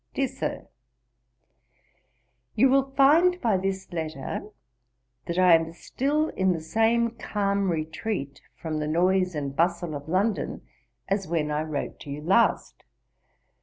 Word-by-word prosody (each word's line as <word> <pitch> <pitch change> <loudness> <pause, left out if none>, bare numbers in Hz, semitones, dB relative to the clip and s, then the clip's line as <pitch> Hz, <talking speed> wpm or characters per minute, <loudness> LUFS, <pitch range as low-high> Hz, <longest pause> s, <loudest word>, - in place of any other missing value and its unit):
'DEAR 275 - +1
SIR, - - -5 1.9
'You 265 - +5
will 270 0 +3
find 330 +6 +5
by 225 - +1
this 190 0 -3
letter, 160 +3 -4 0.8
that 170 - -3
I 185 -2 +6
am 165 0 +3
still 290 - -1
in 190 -1 +1
the 165 - -3
same 225 +7 +1
calm 200 -3 -1
retreat, 160 -1 -3
from 155 -2 -4
the 150 - -2
noise 180 +2 +2
and 140 -2 -4
bustle 170 0 0
of 145 +1 -7
London, 200 +5 -1 0.4
as 195 -1 -1
when 155 -2 -1
I 150 +1 0
wrote 155 -2 -4
to - - -11
you 145 +2 -6
last. 195 +8 +1
185 Hz, 135 wpm, -26 LUFS, 160-225 Hz, 1.9 s, I